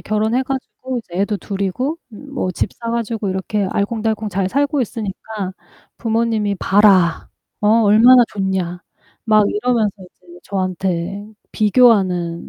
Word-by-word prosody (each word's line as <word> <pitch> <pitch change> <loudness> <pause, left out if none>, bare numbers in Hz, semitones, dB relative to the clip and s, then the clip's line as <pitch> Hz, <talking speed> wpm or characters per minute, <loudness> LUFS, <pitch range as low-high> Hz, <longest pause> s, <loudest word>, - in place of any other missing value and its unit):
결혼해 220 +4 0
가지고 260 -1 -5
이제 175 -4 -8
애도 205 +1 0
2 195 0 -6
이고 255 - -2
뭐 255 -3 -5
집 - - -2
사 230 -1 -5
가지고 230 -3 -2
이렇게 190 +2 -2
알콩달콩 220 0 -1
잘 190 -1 -1
살고 285 +5 0
있으니까 210 -3 -5 0.4
부모님이 225 -3 0
"봐라. 190 -4 +3 0.3
어 210 - +2
얼마나 230 +4 +7
좋냐." 190 -3 -2 0.4
막 215 -2 +4
이러면서 220 -2 0
이제 175 -1 -17
저한테 185 0 -3 0.2
비교하는 195 -7 +2
210 Hz, 280 characters per minute, -18 LUFS, 190-230 Hz, 0.4 s, 얼마나